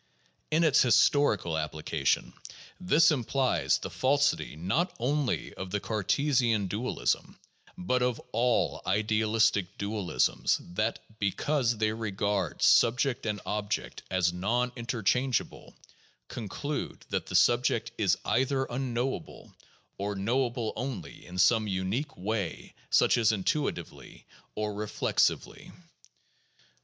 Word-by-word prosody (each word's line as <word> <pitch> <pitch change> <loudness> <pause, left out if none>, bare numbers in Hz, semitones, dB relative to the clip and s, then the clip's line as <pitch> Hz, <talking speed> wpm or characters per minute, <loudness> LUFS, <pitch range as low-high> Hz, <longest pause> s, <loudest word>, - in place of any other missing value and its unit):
In 160 +2 +2
its 150 -3 +5
historical 125 - +3
application, 75 -2 -1 0.5
this 165 -3 +4
implies 135 -1 +1
the - - -7
falsity 140 - +1
not 100 - 0
only 140 +2 -1
of 95 - -7
the 105 +2 -1
Cartesian 115 +1 +1
dualism, 105 +7 -2 0.4
but 125 +8 0
of 125 -1 0
all 120 +2 +1
idealistic 110 -1 +1
dualisms 100 -10 0 0.2
that, 110 +4 0 0.2
because 120 +4 0
they 110 0 +1
regard 100 -4 -2
subject 120 +1 +3
and 105 -1 -2
object 105 0 -3
as 90 -2 +1
non 120 +8 0
interchangeable, 120 +2 -1 0.5
conclude 140 +6 -5
that - - -2
the - - -5
subject 120 -1 +3
is 95 -5 +3
either 135 +1 +1
unknowable, 125 0 -4 0.5
or 100 +1 -2
knowable 120 +3 -1
only 115 - -6
in 90 +1 -8
some 110 +3 +4
unique 100 +9 -2
way 100 -1 -3 0.2
such - - +4
as 115 -1 +4
intuitively 105 - -3 0.3
or 105 0 -2
reflexively. 105 +1 -1
110 Hz, 105 wpm, -29 LUFS, 100-130 Hz, 0.5 s, its